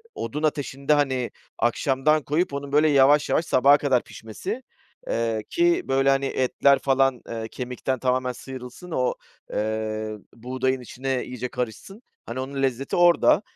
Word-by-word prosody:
odun 150 +2 -4
ateşinde, 145 -1 0
hani, 130 -4 0 0.3
akşamdan 135 +5 +2
koyup 155 +1 0
onun 140 0 -5
böyle 150 +2 +4
yavaş 145 +1 +5
yavaş 165 - +2
sabaha 140 -1 +5
kadar 135 -4 +1
pişmesi. 190 - -7 0.4
Eee, 115 -2 -1
ki, 345 +1 +2
böyle, 135 +1 +2
hani, 135 0 +2
etler 135 +1 +2
falan, 135 -2 +2
eee, 115 -1 -4
kemikten 125 +1 -4
tamamen 125 0 0
sıyrılsın 130 +7 -9
o, 125 -5 +1 0.4
eee, 110 0 -2 0.2
buğdayın 130 +2 -2
içine 130 +1 -3
iyice 125 0 -5
karışsın. 125 - -6 0.2
Hani, 120 +2 -5
onun 135 +1 -4
lezzeti 135 0 -1
orada 175 +2 +5
135 Hz, 140 wpm, -24 LUFS, 125-145 Hz, 0.4 s, yavaş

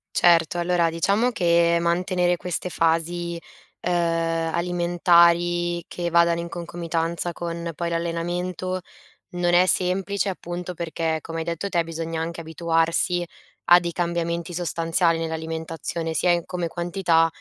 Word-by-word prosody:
Certo, 170 -1 +4
allora 170 -1 +2
diciamo 200 +9 +1
che 170 -4 +3
mantenere 175 +1 +1
queste 180 +1 -3
fasi, 170 +1 0 0.4
uhm, 180 - 0 0.6
alimentari 175 0 +3
che 175 -1 -4
vadano 170 0 +3
in 170 - -5
concomitanza 170 0 -2
con 170 0 -4
poi 170 -1 -2
l'allenamento, 175 +2 -2 0.5
non 175 0 +1
è 180 +1 +6
semplice 195 +2 0
appunto 175 0 -5
perché, 165 -1 -2
come 165 0 -6
hai 160 - -2
detto 170 +4 -3
te, 170 -3 +1
bisogna 165 0 -4
anche 170 +1 -4
abituarsi 165 +2 0 0.4
a 175 0 +8
dei 170 -1 -3
cambiamenti 170 0 -2
sostanziali 165 0 +1
nell'alimentazione, 160 0 -4
sia 180 - +1
in 170 -1 +1
come 180 -2 -3
quantità, 170 -1 +1
170 Hz, 130 wpm, -24 LUFS, 165-175 Hz, 0.6 s, a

